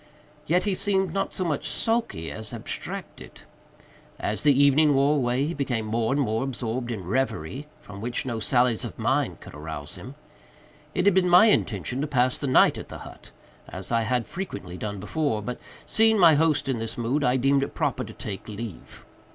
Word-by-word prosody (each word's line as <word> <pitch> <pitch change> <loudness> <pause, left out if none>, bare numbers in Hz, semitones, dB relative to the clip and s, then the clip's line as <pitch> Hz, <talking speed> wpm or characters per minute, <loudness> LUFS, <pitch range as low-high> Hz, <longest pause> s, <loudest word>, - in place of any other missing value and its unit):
Yet 180 +3 +3
he 205 - 0
seemed 190 -2 0
not 195 - -1
so 185 - -2
much 150 -4 -2
sulky 225 - -1
as 110 -1 -7
abstracted. - - -6 0.8
As 105 - -1
the 145 -2 +4
evening 145 +1 +5
wore 140 +2 +3
away 125 +1 +1
he 165 - -2
became 130 -6 -2
more 110 +2 0
and 140 - +1
more 110 -3 0
absorbed 120 -2 -3
in 110 -6 -4
reverie, 130 - -2
from 100 -1 -10
which 120 +3 -2
no 120 -3 -3
sallies 120 0 +2
of - - -6
mine - - 0
could - - -12
arouse 75 0 -6
him. 130 +3 -10 0.8
It 180 - +1
had 200 - +6
been 185 -1 +3
my 180 +4 +8
intention 120 - 0
to 150 - -1
pass 130 -3 +1
the 140 - -2
night 130 - +5
at - - -8
the - - -8
hut, - - -13 0.4
as - - -7
I 115 -1 +3
had 115 +1 0
frequently 105 - -6
done 100 +2 -5
before, 110 +3 -1
but, 125 +3 -5 0.3
seeing 220 0 +3
my 170 -5 +7
host 155 -2 +2
in 130 -4 -1
this 115 0 -4
mood, 125 +5 0
I 125 0 +3
deemed 135 +2 +3
it 140 - -4
proper - - -1
to - - -9
take 100 0 -7
leave. 105 -3 -8
130 Hz, 195 wpm, -26 LUFS, 110-150 Hz, 0.8 s, my